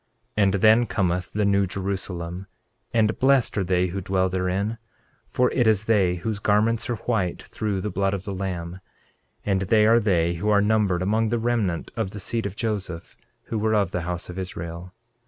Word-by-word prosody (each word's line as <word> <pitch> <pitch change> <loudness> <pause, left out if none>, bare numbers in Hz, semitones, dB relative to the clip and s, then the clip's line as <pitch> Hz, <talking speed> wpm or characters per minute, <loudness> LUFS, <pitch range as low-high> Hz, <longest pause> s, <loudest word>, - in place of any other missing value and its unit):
13:10 105 - +3
And 95 -1 +3
then 110 +4 +5
cometh 90 -3 -1
the 105 0 +1
New 100 -1 +3
Jerusalem; 95 -1 -4 0.4
and 110 -1 +1
blessed 135 -2 +3
are - - +1
they 90 0 +1
who 95 +3 -4
dwell 95 0 +1
therein, 95 +4 -1 0.5
for 125 0 +1
it 120 -3 +2
is 110 -1 +3
they 100 -6 +3
whose 105 +4 -3
garments 110 +3 +1
are 120 - 0
white 105 -6 -2
through 105 -3 -3
the 105 - -3
blood 95 +1 0
of 95 - -6
the 100 - -5
Lamb; 90 -2 -4 0.7
and 95 -2 +1
they 105 +3 +3
are 115 +2 +6
they 85 -6 +2
who 85 +5 -2
are 105 -1 +5
numbered 100 -4 +2
among 110 +3 +1
the 120 - +1
remnant 110 -7 -1
of 110 -5 -1
the 100 - -8
seed 115 +2 -2
of 100 - -8
Joseph, 100 -7 -4 0.3
who 110 - -3
were 110 +1 +1
of 100 -4 +1
the 90 - -2
house 90 +1 -4
of 90 +1 -6
Israel. 85 -1 -6
100 Hz, 195 wpm, -24 LUFS, 90-110 Hz, 0.7 s, are